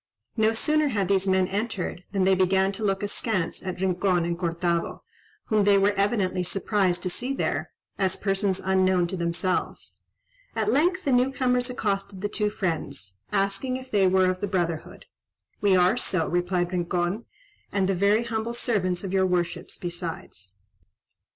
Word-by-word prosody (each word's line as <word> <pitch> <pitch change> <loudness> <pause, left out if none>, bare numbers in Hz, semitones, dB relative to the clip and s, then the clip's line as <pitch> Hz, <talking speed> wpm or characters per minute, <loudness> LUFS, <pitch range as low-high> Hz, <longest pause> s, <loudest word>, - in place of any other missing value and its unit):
No 220 0 +3
sooner 305 +6 +2
had 205 -8 -1
these 195 -1 +2
men 190 -1 +3
entered, 200 -3 -3
than 195 -2 +1
they 190 +1 +4
began 190 +1 +3
to 215 +3 -6
look 195 -1 0
askance 205 -3 -1
at 185 -1 -5
Rincon 185 -1 +1
and 170 0 -1
Cortado, 170 0 -1 0.4
whom 215 -2 +2
they 200 0 +5
were 200 +1 +4
evidently 200 -2 0
surprised 185 -1 0
to 185 - 0
see 255 +8 -2
there, - - -1 0.3
as 190 -1 +1
persons 195 -1 0
unknown 185 -1 +3
to 180 +2 -4
themselves. 170 +1 -2 0.6
At 215 -1 +1
length 355 +8 +2
the 275 - +2
new 250 +1 +3
comers 250 -2 +1
accosted 200 -5 -2
the 205 - -1
two 210 0 0
friends, 160 - -3
asking 200 +7 0
if 260 0 -11
they 195 -3 +4
were 185 0 +4
of 185 +1 -6
the 205 - 0
brotherhood. 175 -4 -3 0.6
"We 200 -2 +4
are 185 +5 +4
so," 185 -9 0
replied 175 0 0
Rincon, 175 +4 -1 0.5
"and 195 -2 +1
the 195 - +2
very 200 +5 +3
humble 230 0 -3
servants 195 -7 0
of 190 -1 -4
your 190 -1 +3
worships 175 -2 -2
besides." 170 - -6
195 Hz, 165 wpm, -26 LUFS, 180-210 Hz, 0.6 s, they